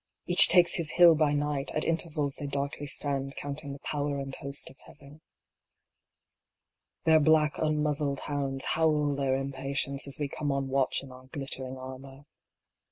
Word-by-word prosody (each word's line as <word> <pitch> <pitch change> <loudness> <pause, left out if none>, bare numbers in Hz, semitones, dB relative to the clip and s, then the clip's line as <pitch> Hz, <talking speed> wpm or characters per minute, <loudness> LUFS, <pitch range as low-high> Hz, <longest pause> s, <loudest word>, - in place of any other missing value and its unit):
Each 175 - +9
takes 175 -1 +4
his 165 -4 -2
hill 175 -1 +7
by 155 -2 +1
night, 145 -1 -1
at 155 - 0
intervals 160 -4 -1
they 145 - -5
darkly 140 +1 -4
stand 140 -1 -2
counting 145 0 -6
the 140 - -7
power 145 -1 -2
and 135 -1 -6
host 140 +1 -5
of 135 - -21
Heaven. 145 +2 -16 1.8
Their 160 -1 +5
black 155 0 +2
unmuzzled 150 -2 -1
hounds 135 -2 -3
howl 150 -3 +1
their 135 -1 0
impatience 135 +1 -1
as 140 - 0
we 145 - -2
come 145 +1 -3
on 135 -1 -2
watch 135 0 0
in 135 - -12
our 130 0 -14
glittering 130 -1 -5
armor. 130 +1 -10
140 Hz, 160 wpm, -28 LUFS, 135-150 Hz, 1.8 s, Each